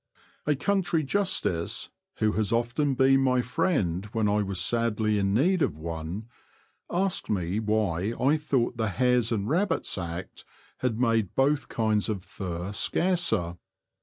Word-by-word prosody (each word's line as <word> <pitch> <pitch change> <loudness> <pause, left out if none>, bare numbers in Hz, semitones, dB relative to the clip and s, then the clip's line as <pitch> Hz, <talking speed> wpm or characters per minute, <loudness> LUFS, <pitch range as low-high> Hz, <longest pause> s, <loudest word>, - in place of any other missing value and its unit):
A 150 - +3
country 175 0 +1
Justice, 150 - 0 0.2
who 110 0 +1
has 105 -1 -1
often 120 +5 +1
been 135 +1 +4
my 125 -2 +2
friend 100 - 0
when 110 -2 +1
I 105 +1 +2
was 95 -2 -2
sadly 110 +1 +1
in 100 -1 +1
need 165 - +2
of 75 - +1
one, 85 +6 -5 0.6
asked 190 +1 0
me 95 0 0
why 105 -2 0
I 140 +4 +4
thought 135 -6 0
the 110 -1 0
Hares 125 +1 +2
and 105 -3 -1
Rabbits 175 - 0
Act 85 +1 -6 0.4
had 120 -3 -1
made 115 -5 +1
both 140 +1 +2
kinds 110 -1 +1
of 100 -4 -3
fur 90 -1 -5
scarcer. 165 - 0
110 Hz, 145 wpm, -27 LUFS, 100-135 Hz, 0.6 s, been